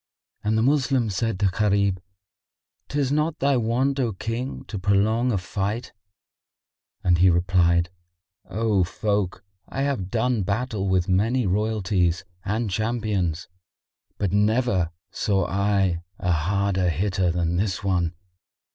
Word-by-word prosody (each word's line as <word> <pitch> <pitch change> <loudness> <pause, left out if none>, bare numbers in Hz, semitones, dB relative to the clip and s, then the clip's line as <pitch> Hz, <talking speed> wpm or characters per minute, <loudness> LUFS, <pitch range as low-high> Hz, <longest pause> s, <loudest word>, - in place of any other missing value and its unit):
And 110 +1 +1
the 110 - +2
Moslems 130 -6 +2
said 115 -4 -1
to - - +3
Gharib, 100 -1 +2 0.9
"'Tis 140 -2 -1
not 150 +2 +1
thy 140 0 +2
want, 125 +4 +1
O 120 -5 0
King, 115 +7 -4
to 105 - -5
prolong 110 +6 +2
a 105 - +1
fight;" 100 +5 -3 1.1
and 90 -2 +3
he 95 +1 +6
replied, 85 0 +2 0.6
"O 105 -3 +1
folk, 100 0 -1 0.3
I 135 - -2
have 130 -10 -1
done 120 0 +1
battle 100 0 -1
with 95 -2 +2
many 110 +7 +2
royalties[FN#56] 95 -3 +1 0.2
and 105 +1 -1
champions; 105 -6 -1 0.7
but 100 -3 -1
never 105 -3 +2 0.2
saw 95 -3 0
I 95 -2 +1 0.2
a 90 - -1
harder 95 +3 +1
hitter 95 +2 0
than 85 0 0
this 100 0 -1
one. 90 -3 0
100 Hz, 130 wpm, -24 LUFS, 90-115 Hz, 1.1 s, he